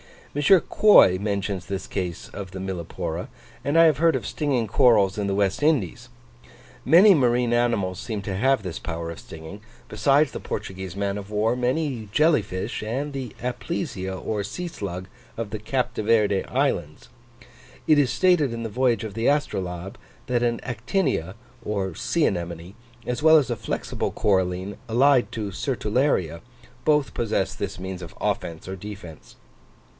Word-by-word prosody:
M. 145 - 0
Quoy 175 - +6
mentions 100 -2 -2
this 95 -1 -4
case 90 -3 -4
of 95 -3 -8
the 95 - -7
Millepora; 95 -3 -4 0.4
and 145 +3 +1
I 165 - +8
have 155 -4 +5
heard 165 +1 +3
of - - -3
stinging 135 -6 0
corals 105 -3 +4
in 100 -1 -1
the 100 - 0
West 100 +2 0
Indies. 125 - +1 0.8
Many 195 +5 +8
marine 125 -5 +2
animals 115 -6 +1
seem 110 -4 -4
to 95 0 -3
have 130 +2 +2
this 90 -4 -5
power 85 0 -5
of 85 - -9
stinging: 80 +5 -10 0.3
besides 135 +7 +3
the - - -6
Portuguese 95 -1 -6
man 100 0 -1
of 100 0 -10
war, 110 +3 +1
many 125 -2 -1
jelly 155 -2 +4
fish, 95 +3 -5
and 130 +7 -3
the 130 -5 -6
Aplysia 125 - -3
or 105 +3 -3
sea 175 - -5
slug 95 - -6 0.3
of 115 -2 -4
the 110 +1 -5
Cape 125 +4 -1
de - - -3
Verd 105 -3 +2
Islands, 90 - -1 0.8
it 155 -1 +5
is 140 -4 +3
stated 145 +1 +3
in 115 0 -4
the 115 - -3
voyage 125 +1 +1
of 110 -3 -6
the 115 +2 -1
Astrolabe, 95 - -1 0.3
that 120 -1 +1
an 120 -1 0
Actinia 120 - -1 0.3
or 100 -4 -2
sea 160 - 0
anemone, 85 0 -3 0.3
as 125 +2 -2
well 160 +1 +7
as 135 -5 +1
a - - 0
flexible - - -3
coralline 95 0 0
allied 125 +3 +4
to 105 -3 -3
Sertularia, 105 - 0 0.5
both 150 -7 +2
possess 105 -4 -1
this 100 -1 -5
means 95 0 -6
of 85 -2 -10
offence 80 0 -3
or 95 0 -5
defence. 95 -5 -10
110 Hz, 165 wpm, -24 LUFS, 95-130 Hz, 0.8 s, I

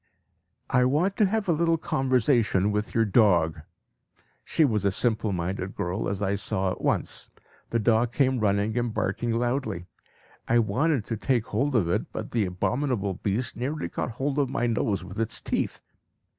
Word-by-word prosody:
"I 125 - +4
want 160 +10 +1
to 210 - +4
have 215 +1 -1
a - - +3
little 165 +1 +2
conversation 125 - +2
with 105 +1 -2
your 115 -1 +4
dog." 90 -7 +3 0.8
She 160 - +2
was 110 -7 0
a 100 - +2
simple 110 0 0
minded 95 +1 -3
girl, 90 +4 -2
as 100 +1 -3
I 100 0 +1
saw 100 -2 -1
at - - -6
once. - - -1 0.4
The 115 - +1
dog 115 +1 +2
came 130 -1 +2
running 105 +1 +1
and 120 -1 -1
barking 110 +3 -2
loudly. 120 -6 -1 0.6
I 120 - +3
wanted 125 +3 +1
to 115 - -3
take 120 0 0
hold 130 +6 -1
of 100 -8 +3
it, 85 - -1
but - - -6
the 115 -4 +1
abominable 105 +2 -1
beast 105 +6 -2
nearly 140 +5 -3
caught 120 - -3
hold 135 +4 -1
of 140 -3 +1
my 120 - -1
nose 110 -5 0
with 95 +4 -8
its 115 - +1
teeth. - - -2
115 Hz, 175 wpm, -26 LUFS, 100-130 Hz, 0.8 s, I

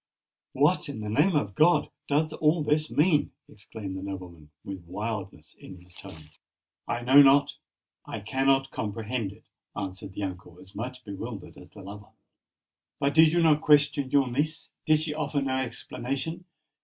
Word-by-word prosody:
"What, - - +2
in 110 - -6
the 105 0 -4
name 180 - +3
of 105 -9 0
God! 160 - +3 0.2
does 155 +2 +1
all 155 +1 +2
this 150 +1 +1
mean?" 150 -1 +2
exclaimed 100 -1 -8
the 95 - -5
nobleman, 90 -6 -8
with 95 -3 -7
wildness 95 -5 -5
in 95 -2 -11
his 90 0 -18
tone. 75 -3 -13 0.6
"I 120 - -2
know 135 +4 +8
not—I 140 -5 0
cannot 135 +4 +1
comprehend 110 0 -3
it," - - -18 0.3
answered 95 -1 -6
the 100 - -5
uncle, 90 -2 -7
as 95 - -14
much 125 +2 -6
bewildered 100 0 -7
as 90 - -14
the 100 +1 -13
lover. 105 +2 -11 0.9
"But 140 +1 +1
did 160 +1 +6
you 170 0 +2
not 155 -2 +4
question 150 -2 +3
your 140 -1 +3
niece? 155 +5 -2 0.2
did 155 -1 +4
she 155 -1 -2
offer 150 -1 -1
no 135 -1 -1
explanation? 135 +6 -4
125 Hz, 160 wpm, -27 LUFS, 100-150 Hz, 0.9 s, know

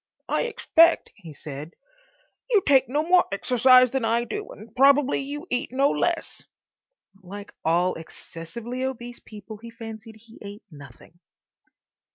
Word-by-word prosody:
"I - - 0
expect," 335 -8 +3
he 175 -7 -13
said, 150 +2 -9 0.7
"you 420 -6 +3
take 265 -3 +4
no 295 +4 0
more 355 +2 +4
exercise 255 +4 +4
than 265 -2 -1
I 230 +1 +1
do, 415 - -6
and 220 +2 -13
probably 275 +1 +4
you 290 +4 -6
eat 245 - -2
no 275 +2 +2
less." - - -2 0.8
(Like 200 +2 -10
all 175 +3 +2
excessively 195 +10 -8
obese 245 -2 -5
people 215 0 -11
he 230 +2 -11
fancied 225 -1 -10
he 225 +1 -17
ate 205 +1 -10
nothing.) 145 +3 -15
230 Hz, 140 wpm, -24 LUFS, 200-270 Hz, 0.8 s, take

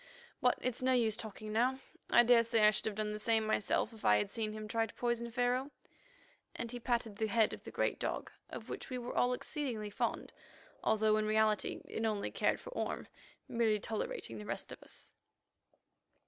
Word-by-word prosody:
But 250 - +4
it's 255 -1 -1
no 260 0 +3
use 225 -4 +3
talking 215 0 -6
now, 235 +3 +4
and 260 - -11 0.3
I 240 - +7
daresay 230 -1 +5
I 210 0 +8
should 210 - -2
have 215 - -2
done 215 0 -1
the 210 - -4
same 220 0 +2
myself 215 +1 +1
if 220 - -13
I 105 - +6
had 105 - -1
seen 220 -2 -2
him 215 0 -6
try 225 +1 +1
to - - -13
poison 235 -1 -1
Pharaoh," 245 +3 +1 0.9
and 230 -1 -4
he 245 - -5
patted 235 -3 -1
the 220 - +1
head 220 0 +3
of - - -8
the - - -7
great - - 0
dog, - - -2 0.2
of - - -7
which - - -6
we 255 - -3
were 245 0 -5
all 245 - +3
exceedingly 250 -6 -3
fond, - - -2 0.5
although 215 0 +3
in 215 0 +1
reality 215 0 +2
it 225 - -4
only 215 -2 0
cared - - +1
for - - -9
Orme, - - -3 0.4
merely 225 -3 +2
tolerating 200 - -3
the 105 - -7
rest 120 - -4
of - - -9
us. - - -9
225 Hz, 205 wpm, -34 LUFS, 215-240 Hz, 0.9 s, I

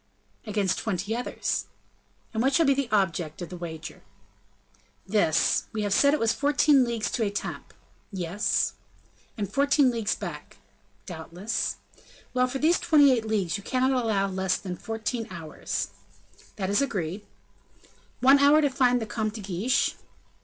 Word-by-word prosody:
"Against 200 -3 0
twenty 205 +1 -2
others." 245 - -2 0.7
"And 220 - 0
what 270 +3 +2
shall 330 - +4
be 275 - +5
the 275 -2 -2
object 170 -6 0
of 175 - -7
the 180 - -7
wager?" 165 -2 -8 1.0
"This. 195 -6 +2
We 215 -1 -2
have 205 -1 0
said 280 +6 +5
it - - -3
was 225 -1 +2
fourteen 285 -1 +4
leagues 230 -4 -2
to 235 - 0
Etampes." 200 -1 -4 0.4
"Yes." 190 +2 0 0.6
"And 205 -2 -4
fourteen 280 -1 +4
leagues 225 -4 -1
back?" - - -8 0.5
"Doubtless." 175 +4 -3 0.6
"Well; 255 0 +2
for 260 +2 -3
these 320 +5 +3
twenty 305 -5 +5
eight 235 -3 +1
leagues 200 -4 0
you 200 - -11
cannot 260 +3 +1
allow 225 -6 +1
less 190 -1 0
than 180 -2 -6
fourteen 225 +2 -4
hours?" 155 - -4 0.7
"That 190 -1 -2
is 205 - +3
agreed." 195 - -2 1.0
"One 270 +2 +7
hour 285 +2 +6
to 285 -2 +2
find 250 -2 +3
the 225 - -3
Comte 215 0 -3
de 220 - -6
Guiche." 200 +8 0
220 Hz, 155 wpm, -26 LUFS, 190-260 Hz, 1.0 s, One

